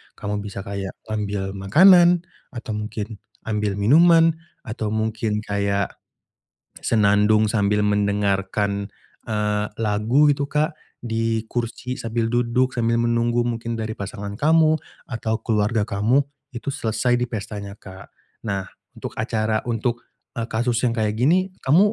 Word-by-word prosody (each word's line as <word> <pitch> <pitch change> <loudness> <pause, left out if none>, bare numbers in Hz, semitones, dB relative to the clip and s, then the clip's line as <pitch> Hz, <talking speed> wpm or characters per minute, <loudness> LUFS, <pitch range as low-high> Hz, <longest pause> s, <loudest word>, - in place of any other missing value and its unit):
Kamu 105 0 -3
bisa 100 -1 -6
kayak 100 -1 -5
ngambil 105 -3 -3
makanan, 175 - +6 0.2
atau 120 -3 -7
mungkin 105 0 -5 0.2
ambil 105 -2 -1
minuman, 165 +10 +5 0.3
atau 110 -2 -4
mungkin 110 0 -1
kayak 100 -1 -1 0.9
senandung 105 0 +3
sambil 105 -1 +2
mendengarkan, 100 0 0 0.4
eee, 105 -1 0
lagu 115 +7 +3
gitu 140 0 -3
Kak. 150 +1 +1 0.3
Di 115 -1 -1
kursi, 125 +1 -3
sambil 115 0 -2
duduk, 120 +2 +1
sambil 115 -1 +1
menunggu 120 0 +1
mungkin 115 -1 -3
dari 110 -1 -3
pasangan 100 0 -6
kamu, 155 +5 +3 0.2
atau 115 -3 -2
keluarga 105 -1 +1
kamu, 115 +8 +2 0.3
itu 140 +4 -4
selesai 120 +2 0
di 125 - -1
pestanya 100 -2 -6
Kak. 95 -1 -12 0.4
Nah, 95 -1 -1 0.3
untuk - - -6
acara 110 -1 0
untuk, 120 +1 -1 0.3
eee, 115 0 -4
kasus 120 +1 0
yang 120 -2 0
kayak 105 -1 +1
gini, 185 +7 +3
kamu 185 +10 +4
110 Hz, 130 wpm, -22 LUFS, 105-120 Hz, 0.9 s, makanan